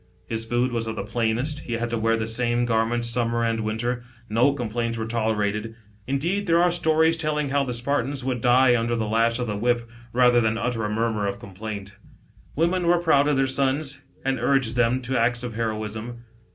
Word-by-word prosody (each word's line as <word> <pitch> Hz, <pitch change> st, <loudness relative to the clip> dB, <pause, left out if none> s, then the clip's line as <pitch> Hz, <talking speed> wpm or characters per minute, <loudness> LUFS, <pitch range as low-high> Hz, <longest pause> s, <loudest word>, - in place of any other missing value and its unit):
His 115 Hz, 0 st, -3 dB
food 120 Hz, +2 st, 0 dB
was 115 Hz, -1 st, -2 dB
of 110 Hz, -, -3 dB
the -, -, -3 dB
plainest; 120 Hz, +6 st, -1 dB
he 120 Hz, -, -6 dB
had 115 Hz, 0 st, -2 dB
to 115 Hz, -, 0 dB
wear 115 Hz, +1 st, +2 dB
the 110 Hz, -, -2 dB
same 120 Hz, +1 st, +1 dB
garment 115 Hz, +1 st, +1 dB
summer 115 Hz, 0 st, 0 dB
and 115 Hz, -1 st, 0 dB
winter; 110 Hz, +3 st, -2 dB, 0.3 s
no 115 Hz, +6 st, +3 dB
complaints 115 Hz, -3 st, -3 dB
were 110 Hz, -, -3 dB
tolerated. 110 Hz, -1 st, -1 dB, 0.3 s
Indeed 170 Hz, +10 st, -1 dB
there 165 Hz, 0 st, +4 dB
are 175 Hz, 0 st, +4 dB
stories 160 Hz, -1 st, +3 dB
telling 150 Hz, -3 st, -1 dB
how 140 Hz, +1 st, +2 dB
the 130 Hz, -, -3 dB
Spartan 125 Hz, +1 st, 0 dB
boys, 140 Hz, -2 st, -4 dB
would 125 Hz, -2 st, -2 dB
die 125 Hz, +1 st, +5 dB
under 120 Hz, 0 st, 0 dB
the 110 Hz, -1 st, -1 dB
lash 115 Hz, +2 st, +2 dB
of 125 Hz, -1 st, -2 dB
tl.9 105 Hz, -1 st, -3 dB
whip, 120 Hz, +1 st, +1 dB, 0.2 s
rather 125 Hz, -1 st, +4 dB
than 110 Hz, 0 st, +1 dB
utter 115 Hz, -1 st, -2 dB
a -, -, -2 dB
murmur 110 Hz, -1 st, 0 dB
of 100 Hz, 0 st, -3 dB
com 100 Hz, -, -12 dB
plaint. 100 Hz, 0 st, -7 dB, 0.6 s
Women 170 Hz, +3 st, +1 dB
were" 175 Hz, +1 st, +5 dB
proud 155 Hz, -4 st, +3 dB
of 145 Hz, -2 st, +2 dB
their 135 Hz, -, +3 dB
sons, 135 Hz, +1 st, -1 dB, 0.3 s
ai'id 135 Hz, -1 st, 0 dB
urged 125 Hz, -2 st, +2 dB
them 120 Hz, +2 st, +2 dB
to 130 Hz, +2 st, -1 dB
acts 120 Hz, +1 st, +1 dB
of 120 Hz, -2 st, -4 dB
heroism. 110 Hz, +1 st, -4 dB
120 Hz, 210 wpm, -24 LUFS, 115-135 Hz, 0.6 s, die